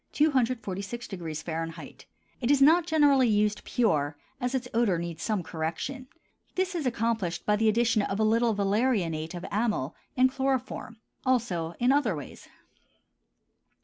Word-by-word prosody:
(246° 225 Hz, -, -1 dB, 0.5 s
F.). 140 Hz, +1 st, -19 dB, 0.4 s
It 240 Hz, -, 0 dB
is 285 Hz, -1 st, +5 dB
not 320 Hz, +5 st, +5 dB
generally 290 Hz, -5 st, +4 dB
used 210 Hz, -1 st, +1 dB
pure, 150 Hz, -11 st, 0 dB, 0.2 s
as 250 Hz, 0 st, -1 dB
its 255 Hz, -1 st, -2 dB
odor 225 Hz, -6 st, +2 dB
needs 170 Hz, -1 st, -5 dB
some 210 Hz, -5 st, -1 dB
correction. 170 Hz, +12 st, -4 dB, 0.5 s
This 375 Hz, 0 st, 0 dB
is 320 Hz, -6 st, -1 dB
accomplished 225 Hz, -7 st, -1 dB
by 210 Hz, -, +3 dB
the 220 Hz, +1 st, +3 dB
addition 225 Hz, 0 st, +2 dB
of 200 Hz, 0 st, -2 dB
a -, -, +3 dB
little 225 Hz, +1 st, +3 dB
valerianate 195 Hz, -6 st, 0 dB
of 175 Hz, -, -6 dB
amyl, 210 Hz, -, 0 dB, 0.2 s
and 260 Hz, +1 st, +5 dB
chloroform. 260 Hz, -3 st, -2 dB, 0.3 s
Also 195 Hz, -11 st, 0 dB
in 245 Hz, +2 st, +3 dB
other 275 Hz, -, +2 dB
ways. 145 Hz, -3 st, -9 dB
225 Hz, 140 wpm, -28 LUFS, 180-255 Hz, 0.5 s, is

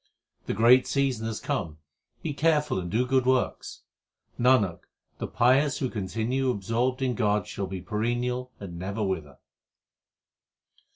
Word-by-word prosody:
The -, -, -1 dB
great 120 Hz, +4 st, +6 dB
season 130 Hz, -5 st, 0 dB
hath 110 Hz, -2 st, -5 dB
come, 75 Hz, -2 st, -2 dB, 0.5 s
be 155 Hz, -, -2 dB
careful 150 Hz, -7 st, +2 dB
and 90 Hz, -1 st, -5 dB
do 115 Hz, +7 st, +1 dB
good 130 Hz, 0 st, +1 dB
works. 130 Hz, -1 st, 0 dB, 0.6 s
Nanak, 120 Hz, -8 st, +3 dB, 0.4 s
the -, -, -3 dB
pious 130 Hz, +4 st, +3 dB
who 130 Hz, -, -2 dB
continue 115 Hz, +6 st, -1 dB
absorbed 120 Hz, +4 st, -1 dB
in 130 Hz, -1 st, +1 dB
God 105 Hz, -4 st, +1 dB
shall 100 Hz, -, -4 dB
be 95 Hz, -1 st, -6 dB
perennial 120 Hz, +5 st, -2 dB
and 85 Hz, -4 st, -8 dB
never 100 Hz, +4 st, -3 dB
wither. 80 Hz, -8 st, -3 dB
120 Hz, 135 wpm, -27 LUFS, 100-130 Hz, 0.6 s, great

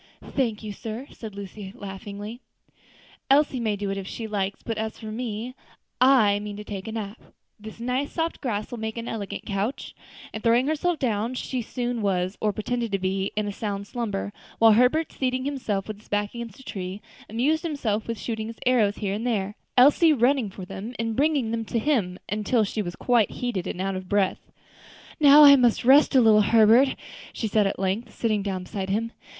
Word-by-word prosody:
"Thank 230 Hz, -6 st, -1 dB
you, 210 Hz, -1 st, -5 dB
sir," 225 Hz, +5 st, -6 dB
said 215 Hz, -3 st, -9 dB
Lucy, 200 Hz, 0 st, -8 dB
laughing; 205 Hz, +2 st, -7 dB, 0.9 s
"Elsie 275 Hz, -1 st, +4 dB
may 220 Hz, -3 st, 0 dB
do 200 Hz, -1 st, -3 dB
it 195 Hz, -, -3 dB
if 190 Hz, -, -7 dB
she 225 Hz, -, -5 dB
likes, 200 Hz, -2 st, -3 dB
but 225 Hz, -2 st, -3 dB
as 220 Hz, 0 st, -3 dB
for 220 Hz, -2 st, -7 dB
me, 230 Hz, +1 st, -4 dB, 0.5 s
I 235 Hz, -6 st, +5 dB
mean 205 Hz, 0 st, -6 dB
to 210 Hz, -, -7 dB
take 200 Hz, -2 st, -7 dB
a -, -, -4 dB
nap; 215 Hz, 0 st, -6 dB, 0.4 s
this 215 Hz, +1 st, -10 dB
nice, 255 Hz, +4 st, -2 dB
soft 330 Hz, 0 st, -2 dB
grass 215 Hz, -6 st, -3 dB
will 240 Hz, -, -5 dB
make 220 Hz, +1 st, -4 dB
an 230 Hz, 0 st, -5 dB
elegant 205 Hz, -3 st, -5 dB
couch;" 205 Hz, +5 st, -3 dB, 0.4 s
and 220 Hz, -, -5 dB
throwing 235 Hz, +3 st, +3 dB
herself 315 Hz, +3 st, 0 dB
down, 230 Hz, -2 st, -1 dB
she 255 Hz, 0 st, -3 dB
soon 240 Hz, 0 st, -3 dB
was, 185 Hz, -1 st, 0 dB
or 215 Hz, -, +2 dB
pretended 230 Hz, +2 st, -3 dB
to -, -, +3 dB
be, 190 Hz, +1 st, -1 dB
in 210 Hz, 0 st, -1 dB
a -, -, -2 dB
sound 200 Hz, -1 st, -4 dB
slumber; 205 Hz, -3 st, -4 dB, 0.2 s
while 225 Hz, 0 st, +7 dB
Herbert, 250 Hz, +9 st, +3 dB
seating 255 Hz, 0 st, -1 dB
himself 235 Hz, -9 st, -2 dB
with 215 Hz, -1 st, -6 dB
his 215 Hz, -, -22 dB
back 205 Hz, 0 st, -1 dB
against 235 Hz, -2 st, -7 dB
a -, -, -13 dB
tree, 190 Hz, -3 st, -5 dB, 0.3 s
amused 275 Hz, +9 st, +1 dB
himself 245 Hz, -, -2 dB
with 230 Hz, -1 st, -4 dB
shooting 220 Hz, -2 st, -4 dB
his 225 Hz, 0 st, -8 dB
arrows 225 Hz, -5 st, +3 dB
here 200 Hz, -2 st, -2 dB
and 220 Hz, +4 st, -3 dB
there, 205 Hz, -4 st, -1 dB, 0.2 s
Elsie 295 Hz, +5 st, +6 dB
running 250 Hz, -3 st, +2 dB
for 190 Hz, -1 st, -9 dB
them 215 Hz, +7 st, -7 dB
and 225 Hz, -1 st, -2 dB
bringing 280 Hz, -4 st, +1 dB
them 230 Hz, 0 st, -1 dB
to 230 Hz, -, -2 dB
him, 220 Hz, -9 st, 0 dB
until 215 Hz, +3 st, +1 dB
she 210 Hz, +1 st, -2 dB
was 175 Hz, -3 st, -5 dB
quite 240 Hz, -4 st, +2 dB
heated 240 Hz, -8 st, -3 dB
and -, -, -5 dB
out 195 Hz, +1 st, -1 dB
of 185 Hz, -1 st, -7 dB
breath. 200 Hz, -2 st, 0 dB, 0.7 s
"Now 295 Hz, 0 st, +8 dB
I 280 Hz, -1 st, +10 dB
must 240 Hz, -3 st, +2 dB
rest 280 Hz, +3 st, +6 dB
a 260 Hz, -, +7 dB
little, 215 Hz, -2 st, +6 dB
Herbert," 230 Hz, +5 st, +5 dB, 0.4 s
she 225 Hz, -, -2 dB
said 210 Hz, -1 st, +2 dB
at -, -, -3 dB
length, 200 Hz, +4 st, -2 dB
sitting 215 Hz, -3 st, 0 dB
down 190 Hz, -2 st, -3 dB
beside 190 Hz, +1 st, -5 dB
him. 225 Hz, +4 st, -1 dB
220 Hz, 200 wpm, -25 LUFS, 205-245 Hz, 0.9 s, I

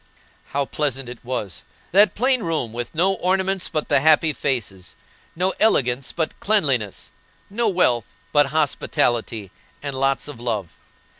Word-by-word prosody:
How 140 Hz, 0 st, -1 dB
pleasant 135 Hz, -3 st, -1 dB
it 120 Hz, -, -10 dB
was; 110 Hz, -8 st, -4 dB, 0.3 s
that 200 Hz, 0 st, +5 dB
plain 255 Hz, +2 st, +2 dB
room, 155 Hz, -, -2 dB
with 120 Hz, +5 st, -5 dB
no 185 Hz, +4 st, +3 dB
ornaments 190 Hz, 0 st, 0 dB
but 155 Hz, -, -2 dB
the 145 Hz, -, +4 dB
happy 155 Hz, +2 st, +4 dB
faces, 100 Hz, -11 st, -2 dB, 0.4 s
no 185 Hz, +3 st, 0 dB
elegance, 130 Hz, -, +2 dB
but 160 Hz, -2 st, -3 dB
cleanliness, 140 Hz, -, 0 dB, 0.4 s
no 230 Hz, +2 st, +1 dB
wealth, 125 Hz, -, +2 dB, 0.2 s
but 145 Hz, -1 st, +4 dB
hospitality 120 Hz, -, 0 dB, 0.3 s
and 140 Hz, -1 st, -3 dB
lots 135 Hz, +1 st, 0 dB
of 145 Hz, -5 st, -9 dB
love. 110 Hz, -8 st, -3 dB
140 Hz, 140 wpm, -22 LUFS, 120-180 Hz, 0.4 s, that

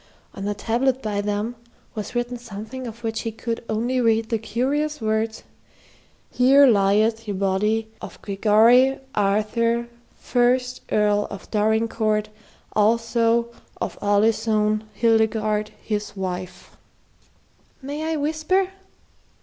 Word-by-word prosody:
On 195 Hz, -, -6 dB
the 205 Hz, 0 st, -1 dB
tablet 245 Hz, +5 st, 0 dB
by 205 Hz, -2 st, -1 dB
them 210 Hz, +3 st, -2 dB, 0.4 s
was 215 Hz, +2 st, -6 dB
written 240 Hz, +1 st, -1 dB
something 235 Hz, +2 st, -7 dB
of 230 Hz, +1 st, -10 dB
which 225 Hz, -1 st, -2 dB
he 225 Hz, -, -3 dB
could 230 Hz, +1 st, -4 dB
only 240 Hz, +4 st, 0 dB
read 225 Hz, -1 st, +2 dB
the 225 Hz, -, 0 dB
curious 285 Hz, +7 st, -1 dB
words: 220 Hz, 0 st, -1 dB, 0.9 s
"Here 270 Hz, +3 st, +6 dB
lyeth 215 Hz, 0 st, +3 dB
ye 205 Hz, -, -2 dB
bodye 200 Hz, +3 st, 0 dB, 0.2 s
of -, -, -9 dB
Gregorye 225 Hz, +6 st, +4 dB
Arthure 225 Hz, +4 st, +1 dB, 0.3 s
Fyrst 250 Hz, +1 st, +1 dB
Earle 210 Hz, -1 st, +2 dB
of 200 Hz, -2 st, -10 dB
Dorincourt 215 Hz, 0 st, +1 dB, 0.5 s
Allsoe 230 Hz, +2 st, +2 dB, 0.3 s
of -, -, -4 dB
Alisone 215 Hz, +1 st, +2 dB
Hildegarde 220 Hz, -2 st, +1 dB, 0.2 s
hys 210 Hz, -1 st, -2 dB
wyfe." 180 Hz, -1 st, -6 dB, 1.0 s
"May 285 Hz, +2 st, -5 dB
I 320 Hz, 0 st, -1 dB
whisper?" 315 Hz, +6 st, 0 dB
225 Hz, 115 wpm, -23 LUFS, 210-245 Hz, 1.0 s, Here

